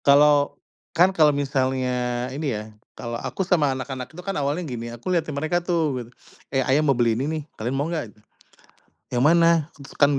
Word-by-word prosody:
Kalau, 145 0 +5 0.4
kan 180 +3 +5
kalo 155 -4 +5
misalnya 130 -3 0
ini 140 -5 -2
ya 105 - -5 0.3
kalo 120 -1 -5
aku 190 - -3
sama 155 -7 +3
anak-anak 130 -1 -5
itu 160 - -12
kan 195 -1 -2
awalnya 145 +4 -1
gini 120 -3 -5
aku 120 +5 -10
lihatin 165 -3 0
mereka 155 +4 0
tuh 165 -6 0
gitu, 115 - -15 0.4
"Eh, 135 - +1
ayah 135 +3 +3
mau 145 - +3
beli 115 -2 +3
ini 130 +4 -1
nih 160 -1 -2
kalian 120 +4 -3
mau 145 +3 0
gak?" 160 -10 -3 1.0
"Yang 125 0 0
mana?" 165 +2 +6 0.5
Kan 145 0 +5
140 Hz, 185 wpm, -24 LUFS, 125-160 Hz, 1.0 s, mana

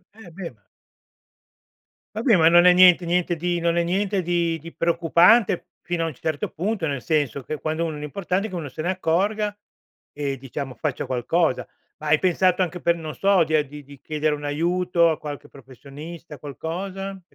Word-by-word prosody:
eh 205 -6 -13
beh 175 0 -7
ma 105 - -36 1.5
Vabbè, 220 -1 +3
ma 160 -2 +5
non 175 +1 +6
è 180 - +8
niente 180 -1 +6
niente 175 0 0
di 175 +1 -1
non 170 0 +1
è 170 - +3
niente 195 +2 0
di 170 -1 0
di 165 +2 -11
preoccupante 170 +5 +3
fino 175 -1 -2
a - - 0
un 160 - -5
certo 150 +3 -3
punto, 195 0 -2
nel 140 -3 -3
senso 140 -3 -1
che 155 +4 -5
quando 160 +2 -2
uno 155 -2 -4
l'importante 180 +7 -2
è - - -10
che 185 - -7
uno 160 -5 -5
se 145 - -7
ne 170 - -1
accorga, 200 +4 0 0.6
e 140 -2 -3
diciamo 135 +1 -6
faccia 150 -5 -3
qualcosa. 130 +4 0 0.3
Ma 155 - -6
hai 150 +1 +4
pensato 185 0 +2
anche 180 -1 -2
per 170 0 +2
non 160 -2 -6
so, 195 -3 +3
di 155 0 0
a 150 - +3
di 145 +1 -11
di 140 -1 -15
chiedere 155 -1 -1
un 145 - -10
aiuto 170 +3 +1
a 155 - -2
qualche 145 -2 -7
professionista, 145 +4 -11
qualcosa. 185 +8 -5
Ti - - -33
170 Hz, 195 wpm, -23 LUFS, 150-180 Hz, 1.5 s, è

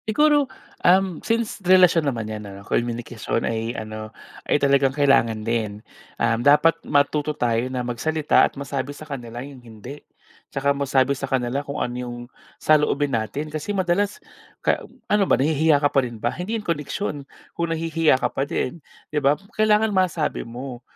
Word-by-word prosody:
Siguro, 290 +3 +3 0.3
uhm, 185 -2 +3
since 230 -1 -1
relasyon 180 -4 +5
naman 115 -4 -3
'yan, 110 0 -6
ano, 100 0 -11
communication 120 -1 -2
ay 115 +1 -2
ano, 110 0 -6 0.4
ay - - +4
talagang 140 -1 +3
kailangan 115 -7 +3
din. 110 -2 -2 0.3
Um, 115 +1 +1
dapat 150 +5 +5
matuto 150 +1 +1
tayo 120 0 0
na 125 -1 -3
magsalita 150 +6 +1
at - - +1
masabi 140 0 -4
sa 155 - -10
kanila 125 -4 -7
'yung 140 -3 -12
hindi. 120 +4 -11 0.5
Tsaka 140 +1 +1
masabi 140 -1 +2
sa 135 0 -5
kanila 130 0 0
kung 140 0 -6
ano 120 - -2
'yung 120 -1 -6 0.4
saloobin 150 -2 +2
natin, 120 +8 -3
kasi 175 +7 -3
madalas 190 +3 +1 0.5
ka - - +2 0.2
ano 210 -1 +2
ba, - - +5
nahihiya 155 +2 +3
ka 145 0 +1
pa 135 - +4
rin 120 -3 -5
ba? - - -1
Hindi 200 +6 -3
'yung 210 - -8
koneksyon, 150 -1 -3 0.2
kung 170 0 -2
nahihiya 165 -3 +2
ka 130 - -2
pa - - -2
din, 165 -1 -2 0.3
di 150 - +1
ba? 140 +2 +3 0.2
Kailangan 215 0 +3
masabi 180 -5 0
mo 120 +1 -8
140 Hz, 165 wpm, -23 LUFS, 120-165 Hz, 0.5 s, relasyon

